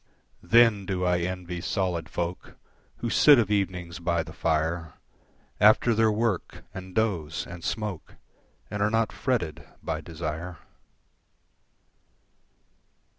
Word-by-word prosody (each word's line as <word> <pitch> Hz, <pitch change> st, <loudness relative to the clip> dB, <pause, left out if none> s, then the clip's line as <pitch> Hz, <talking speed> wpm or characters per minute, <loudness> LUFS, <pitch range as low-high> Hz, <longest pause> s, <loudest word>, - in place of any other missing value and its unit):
Then 105 Hz, 0 st, +4 dB
do 90 Hz, -2 st, -1 dB
I 90 Hz, -1 st, +2 dB
envy 90 Hz, 0 st, -4 dB
solid 90 Hz, -4 st, -1 dB
folk 85 Hz, +1 st, -4 dB, 0.5 s
Who 115 Hz, -, -1 dB
sit 145 Hz, -2 st, +7 dB
of 110 Hz, -4 st, +1 dB
evenings 90 Hz, -4 st, -1 dB
by 85 Hz, -1 st, 0 dB
the 80 Hz, -, -11 dB
fire, 80 Hz, +2 st, -1 dB, 0.7 s
After 110 Hz, +3 st, +5 dB
their 110 Hz, 0 st, +3 dB
work 105 Hz, -3 st, -2 dB
and 95 Hz, 0 st, -9 dB
doze 90 Hz, -9 st, -1 dB
and 90 Hz, -1 st, -9 dB
smoke, 105 Hz, -7 st, -4 dB, 0.6 s
And 105 Hz, -1 st, -3 dB
are 105 Hz, -, +3 dB
not 115 Hz, 0 st, +1 dB
fretted 90 Hz, -12 st, -2 dB, 0.2 s
by 80 Hz, -1 st, -3 dB
desire. 85 Hz, +1 st, -5 dB
90 Hz, 120 wpm, -27 LUFS, 85-105 Hz, 0.7 s, sit